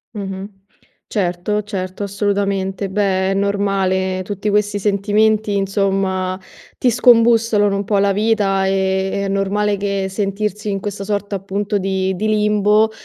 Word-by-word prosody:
Mh-mh, 195 -1 -5 0.6
certo, 190 +2 -1
certo, 190 -1 -5
assolutamente. 200 -1 -1
Beh, 190 -1 +1
è - - +1
normale, 195 -2 0
tutti 200 +2 -5
questi 205 0 +1
sentimenti 210 +1 +1
insomma 195 -1 0 0.4
ti 250 - +2
scombussolano 230 -4 +4
un 200 - -1
po' 205 0 0
la 200 0 +3
vita, 205 -2 +1
ehm, 190 0 0
è - - -2
normale 200 +1 0
che 200 -1 -2
sentirsi 210 +1 -2
in 195 -1 -1
questa 200 0 -5
sorta 205 0 -2
appunto 200 +2 -2
di 190 -1 -1
di 210 +4 -2
limbo, 210 0 +3
200 Hz, 135 wpm, -18 LUFS, 195-210 Hz, 0.6 s, scombussolano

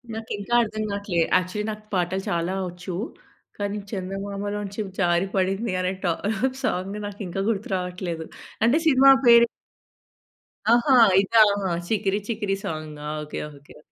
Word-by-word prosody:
నాకు 225 0 -7
ఇంకా 205 +4 -5
అర్థం 215 -1 -4
కావట్లే. 200 -4 -1 0.2
యాక్చువల్లి, 185 +4 -3
నాకు 215 0 -8
పాటలు 185 +1 0
చాలా 170 +2 -1 0.2
వచ్చు. 180 +1 -7 0.6
కానీ 205 0 -2
చందమామలొంచి 200 +1 -4 0.2
జారి 175 +1 +2
పడింది 195 +3 0
అనే 185 0 0
ట - - -2 0.6
సాంగు 195 +3 -2
నాకు 205 +1 -7
ఇంకా 195 +3 -3
గుర్తు 210 -2 -2
రావట్లేదు. 180 -2 -4 0.4
అంటే 235 +7 +4
సినిమా 270 -1 +7
పేరు. 235 0 +8 1.3
ఆహా! 255 +3 +4 0.3
ఇదా! 225 +3 +4 0.4
'చికిరి 205 -1 0
చికిరి' 205 -4 -1
సాంగా! 155 -2 -6 0.2
ఓకే. 150 - -6 0.2
ఓకే. 140 +1 -17
195 Hz, 130 wpm, -24 LUFS, 180-215 Hz, 1.3 s, పేరు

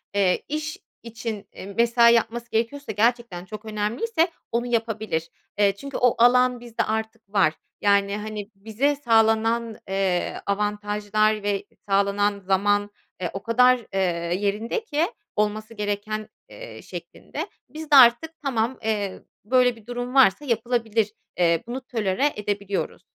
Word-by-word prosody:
eee, 190 -3 +2
iş 305 0 -3 0.3
için, 225 -3 -6
eee, - - -9
mesai 235 0 +5
yapması 235 +1 0
gerekiyorsa 230 +4 -1
gerçekten 225 -4 0
çok 215 +2 -9
önemliyse 235 - 0 0.2
onu 240 +1 0
yapabilir. 220 -8 -1 0.3
Eee, 200 -1 +4
çünkü 275 +7 -6
o 250 -1 +3
alan 250 0 +5
bizde 235 -1 -3
artık 220 -1 -4
var. 190 -6 +4 0.3
Yani, 200 0 +3
hani, 210 -1 -6
bize 225 +8 0
sağlanan, 225 -2 +2
eee, 190 -2 -1
avantajlar 210 +1 0
ve 205 -1 -1 0.2
sağlanan 200 +1 +2
zaman, 205 +2 +1 0.3
eee, 175 - -1
o 195 - -6
kadar, 250 +3 +5 0.2
eee, 195 - 0 0.4
yerinde 210 - -1
ki 315 -6 0 0.3
olması 215 +1 -1
gereken, 210 0 -3 0.2
eee, - - -10
şeklinde, - - -7 0.2
biz 310 +3 -9
de - - +7
artık 255 +5 +7
tamam, 245 -2 0
eee, 205 -3 -2 0.2
böyle 250 +1 +3
bir 225 -2 -18
durum 245 +1 -5
varsa 265 -1 +5
yapılabilir. 230 -3 0 0.2
Eee, 170 -2 +2
bunu 250 +3 -4
tolere 235 +2 0
edebiliyoruz. 205 -1 -3
220 Hz, 135 wpm, -24 LUFS, 205-240 Hz, 0.4 s, de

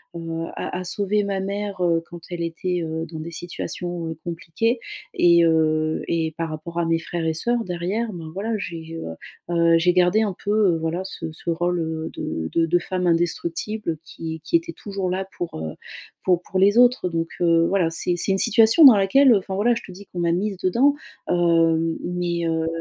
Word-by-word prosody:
heu, 165 0 -4
à - - -4
à 185 - -4
sauver 205 +3 0
ma 195 -1 -2
mère, 200 -1 -4
heu, 165 -1 +2
quand 175 0 -10
elle 170 -1 -4
était, 175 +1 -2
heu, 160 0 -3
dans 160 - -6
des 165 +2 -6
situations, 175 0 -5
heu, 160 - -5
compliquées 175 +8 -1 0.4
et 170 -1 +5
heu 155 -1 +2
et 160 -2 -1
par 165 -1 -2
rapport 160 +2 -7
à 170 - +1
mes 165 0 +1
frères 170 0 -4
et 160 - +1
sœurs 235 +8 0
derrière 185 +5 -3
ben, 165 -2 -7
voilà 215 +5 -2
j'ai, 165 -3 -6
heu 80 - -6 0.4
heu, 165 0 +5
j'ai 180 +1 +3
gardé 180 +4 +4
un 200 -4 -1
peu, 205 - 0 0.2
heu, - - -1
voilà, 165 +3 -2
ce 165 -4 -6
ce 165 +2 -7
rôle, 175 +1 0
heu, 160 0 -3
de 80 - -4
de 165 0 +2
de 175 +2 +3
femme 180 0 -2
indestructible 170 +2 -1
qui 160 0 -7
qui 340 - 0
était 335 0 +1
toujours 195 -3 -4
là 190 +1 -2
pour, 175 - -5
heu, 80 -1 -5 0.5
pour 180 -1 +2
pour 190 - -2
les 205 +4 +4
autres 245 -6 +4
donc, 165 -1 -2
heu, 165 -1 +4
voilà 185 -4 +2
c'est 175 +1 0
c'est 195 - +1
une 190 - +2
situation 225 +7 +6
dans 250 -5 +10
laquelle 235 +6 +5
enfin 190 -1 -2
voilà 235 +4 +3
je - - -4
te 185 - -11
dis, 200 +3 -12
qu'on 175 - -7
m'a 170 - +1
mise 195 +1 -1
dedans, 245 +11 +3 0.3
hem, 165 -1 +2
mais, 175 -1 -2
heu, 160 0 0
175 Hz, 210 wpm, -23 LUFS, 165-195 Hz, 0.5 s, dans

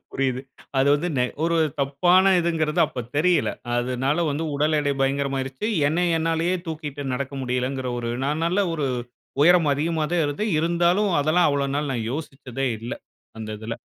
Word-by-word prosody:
புரியுது. 130 -2 -1 0.4
அது 135 - +3
வந்து 155 +5 -1
நெ 125 - +3 0.2
ஒரு 170 0 +1 0.2
தப்பான 175 +8 +4
இதுங்குறது 165 -1 0
அப்ப 130 - -5 0.2
தெரியலை. 175 +3 +2 0.2
அதுனால 130 +6 0
வந்து 145 +3 -2
உடல் 150 +2 +2
எடை 145 -1 +1
பயங்கரமா 135 0 0
ஆயிருச்சு. 135 +8 -4 0.2
என்னை 170 +4 +1
என்னாலயே 165 +2 0
தூக்கிட்டு 150 -3 -5
நடக்க 135 +2 -3
முடியல்லைங்குற 125 +1 -2
ஒரு 120 -1 -3 0.2
நான் 150 +3 -1
நல்ல 180 +4 +1
ஒரு 150 -4 -1 0.5
உயரம் 170 0 +5
அதிகமா 155 +2 0
தான் 175 -2 +2
இருந்தேன். 180 +9 -1
இருந்தாலும் 175 +5 +2
அதெல்லாம் 155 +4 +3
அவ்வள 140 -1 0
நாள் 145 0 -1
நான் 115 -3 -2
யோசிச்சதே 135 -3 -4
இல்ல, 115 +3 -6 0.5
அந்த 110 -1 -6
இதில. 110 +2 -5
145 Hz, 160 wpm, -24 LUFS, 135-165 Hz, 0.5 s, உயரம்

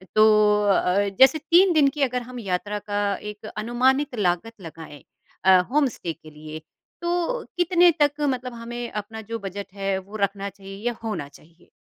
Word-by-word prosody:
तो 215 -1 +5
अ, 200 0 +2
जैसे 265 +3 +7
3 355 +4 +4
दिन 300 -3 +5
की 290 +2 -3
अगर 250 -1 0
हम 250 +1 -9
यात्रा 205 0 -3
का 205 -1 -1
एक 210 +2 -9
अनुमानित 255 +5 +1
लागत 180 +4 0
लगाएँ 160 -4 -11 0.4
अ, 190 -1 +7
होम 290 0 +3
स्टे 175 -8 -5
के 155 0 -16
लिए, 155 +1 -9 0.4
तो 350 +8 -1
कितने 355 0 +5
तक 290 0 +2
मतलब 255 -3 -1
हमें 235 +1 -6
अपना 215 +1 -6
जो 230 +2 -6
बजट 195 -1 -7
है 195 -1 -1
वो 195 +3 -13
रखना 200 0 -1
चाहिए 195 0 -11
या 240 - -1
होना 210 -10 -3
चाहिए? 165 +4 -21
215 Hz, 175 wpm, -24 LUFS, 195-260 Hz, 0.4 s, जैसे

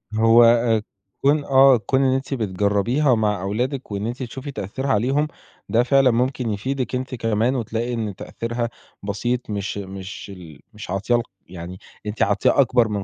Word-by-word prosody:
هو، 115 +1 +6
آآ، 115 -2 +4 0.4
كون 145 +1 +3
آه، 135 -1 +6
كون 130 +4 0
إن 130 -1 +3
أنتِ 135 +1 -3
بتجرّبيها 110 +5 +1
مع 105 -4 0
أولادِك، 125 +6 -3
وإن 100 +1 -3
أنتِ 125 +2 -4
تشوفي 130 +4 -7
تأثيرها 130 +5 -4
عليهم، 135 +6 +1 0.4
ده 115 +2 +3
فعلًا 135 0 +4
ممكن 125 0 0
يفيدِك 130 +5 -2
أنتِ 130 0 -3
كمان، 115 +3 0
وتلاقي 115 +1 -2
إن 110 -4 -3
تأثيرها 120 +3 -4 0.3
بسيط، 120 +4 -2
مش 100 0 -3
مش 95 0 -7
ال 80 -6 -12
مش 105 -3 -10
عاطياه 100 +6 0
ال 120 - -1 0.2
يعني 90 +1 -8 0.3
أنتِ 105 +1 -5
عاطياه 105 +7 +3
أكبر 120 -3 +3
من 100 -2 -3
115 Hz, 165 wpm, -22 LUFS, 105-130 Hz, 0.4 s, هو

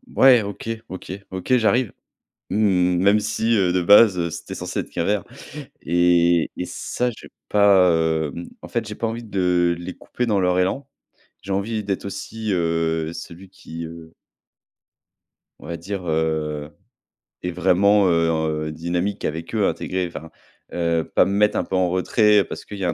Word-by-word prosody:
Ouais, 125 -5 +6
OK. 100 +3 -7 0.2
OK. 95 -1 -8 0.2
OK, 95 +7 0
j'arrive». 120 0 +2 0.6
Mmh, 90 -3 +2
même 100 +3 +4
si, 110 +2 0
heu, 90 -3 +2
de 90 - +2
base, 100 +1 +6
heu, 85 -1 -1
c'était 85 +1 -7
censé - - -4
être - - -5
qu'un - - -2
verre. 105 -1 0 0.6
Et 85 -1 +3
et - - -3
ça, 125 0 -3
j'ai 115 - -11 0.2
pas, 100 -3 +5 0.4
hem, 85 - -7
en - - -9
fait, 115 -2 -2
j'ai 105 - -6
pas 115 - -2
envie 115 +1 -5
de 90 -4 +1
les 90 +1 -7
couper 125 - -4
dans 105 -4 +1
leur 90 0 +2
élan. 135 +10 -1 0.6
J'ai 95 +1 -5
envie 105 +3 -1
d'être 100 -1 -3
aussi, 110 +1 -5
heu, 80 -2 0
celui 90 +3 -10
qui, 85 -3 -9
heu 80 0 -12 1.5
on - - -12
va 85 -1 -4
dire, 95 +2 -5
heu, 80 -1 -1 0.7
est 90 - -2
vraiment, 95 +3 +3
heu, 85 -1 +2
en, 80 0 0
heu, 75 0 -3
dynamique 85 +5 -3
avec 80 +5 -4
eux, 105 -3 +2
intégré 90 -1 -2
enfin. 80 -1 -9 0.4
Heu, 85 -1 0
pas - - +5
me 95 - -2
mettre 105 +1 +2
un - - +1
peu 95 - -4
en 90 -1 +2
retrait 105 +3 +3
parce - - -8
qu'il 100 - -8
y - - -3
a 90 - +1
un - - -1
90 Hz, 180 wpm, -22 LUFS, 85-105 Hz, 1.5 s, Ouais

